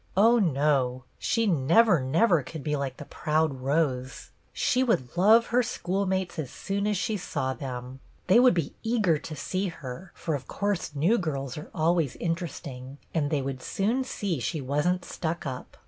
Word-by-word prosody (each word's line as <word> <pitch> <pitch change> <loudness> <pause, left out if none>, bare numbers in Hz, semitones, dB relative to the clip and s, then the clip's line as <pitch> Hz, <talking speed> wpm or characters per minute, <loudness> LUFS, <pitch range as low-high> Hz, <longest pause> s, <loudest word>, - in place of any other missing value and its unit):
Oh, 230 +4 +6
no! 140 - +1 0.2
She 230 0 +1
never, 175 - +4
never 165 - +3
could 145 +3 -8
be 150 -1 0
like 140 -2 -3
the - - -8
proud 155 -4 0
Rose! 135 -2 -1 0.2
She 250 - +1
would 195 - 0
love 220 +6 +6
her 250 - +5
schoolmates 190 -5 -2
as 140 -5 -3
soon 200 +8 -2
as 210 -2 +1
she 220 +2 -1
saw 135 -7 -2
them. 130 -2 -6 0.3
They 190 +6 +6
would 250 -5 +6
be 165 -5 -1
eager 215 -9 +2
to 155 +1 -7
see 185 +7 -2
her, 165 +1 -8
for 165 - -3
of 135 -3 -4
course 200 -7 -2
new 175 +12 +3
girls 140 -7 -3
are 150 - -8
always 165 -3 +1
in 170 -1 0
teresting, 140 -6 -7 0.2
and 150 -3 +1
they 145 -3 0
would 135 -1 -4
soon 225 - 0
see 200 - -3
she 120 +6 -2
was 145 +4 0
n't 180 0 0
stuck 165 -1 -4
up. 130 -2 -6
160 Hz, 180 wpm, -27 LUFS, 135-195 Hz, 0.3 s, Oh